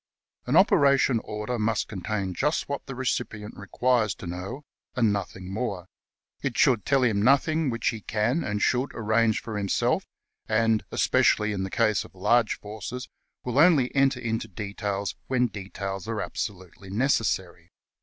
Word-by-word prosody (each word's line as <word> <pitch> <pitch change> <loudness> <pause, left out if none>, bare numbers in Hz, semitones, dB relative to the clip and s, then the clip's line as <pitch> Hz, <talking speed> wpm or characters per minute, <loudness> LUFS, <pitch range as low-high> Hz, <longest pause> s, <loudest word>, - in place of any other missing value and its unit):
" - - -51
An - - +1
operation 140 -3 +5
order 105 +3 -4
must 110 0 0
contain 100 -1 -3
just 150 - 0
what 140 0 -5
the 135 - -6
recipient 115 -4 -3
requires 110 0 0
to - - -10
know 90 +11 -6 0.3
and 115 -5 +3
nothing 95 -1 -5
more. 100 -5 -3 0.6
It 135 -4 -2
should 125 -9 +3
tell 135 -1 +3
him 110 -5 +2
nothing 140 +5 +3
which 115 -1 0
he 110 -2 -5
can 115 +11 0
and 105 0 -1
should 130 +2 +1
arrange 110 0 +1
for 110 -2 -4
himself, 100 -1 0 0.4
and, 110 0 +2
especially 105 0 +3
in 95 - -3
the 95 - -3
case 110 0 +2
of - - -16
large 115 +4 +2
forces, 110 +5 -7 0.3
will 125 +2 0
only 150 -7 +5
enter 135 -2 +3
into 115 -2 -2
details 100 0 -4
when 125 -1 +2
details 95 -2 -5
are 115 -1 -2
absolutely 95 -1 -6
necessary. 95 -7 0
110 Hz, 155 wpm, -26 LUFS, 100-125 Hz, 0.6 s, operation